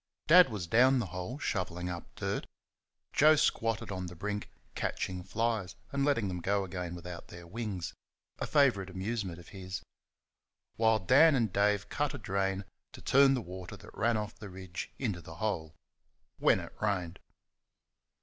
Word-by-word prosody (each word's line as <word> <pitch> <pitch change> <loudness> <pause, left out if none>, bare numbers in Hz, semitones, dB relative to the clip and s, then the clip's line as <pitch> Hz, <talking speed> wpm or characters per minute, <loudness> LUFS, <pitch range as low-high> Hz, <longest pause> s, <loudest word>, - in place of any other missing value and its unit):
Dad 180 +3 +8
was 105 -5 -4
down 125 +8 +5
the 120 - 0
hole 90 +8 -4
shovelling 90 - -2
up 90 -1 -6
the - - -5
dirt; - - -2 0.7
Joe 155 +2 +7
squatted 115 -7 +1
on 90 -1 -3
the 90 - -8
brink 105 +4 -3 0.2
catching 90 -1 -2
flies 110 -3 -1 0.2
and 140 0 0
letting 140 -8 +2
them 90 -2 -3
go 100 +2 +1
again 90 -2 -4
without 85 0 -8
their 90 0 -10
wings 100 -1 -4 0.5
a - - -2
favourite 125 -11 +3
amusement 95 -1 -3
of 85 - -13
his; 95 -1 -6 0.9
while 110 0 +4
Dan 140 - +6
and 115 -7 +1
Dave 100 0 +2
cut 145 -1 -1
a - - -4
drain 95 -2 -1 0.3
to - - -10
turn 135 0 +6
the 125 - -1
water 90 +2 -8
that 105 +3 -14
ran 115 0 +2
off 105 0 -3
the 105 -2 -8
ridge 95 -1 -7
into 105 -10 -2
the 80 0 -10
hole 85 -6 -2 0.6
when - - +4
it - - -8
rained. 95 -4 -1
100 Hz, 170 wpm, -31 LUFS, 90-115 Hz, 0.9 s, Dad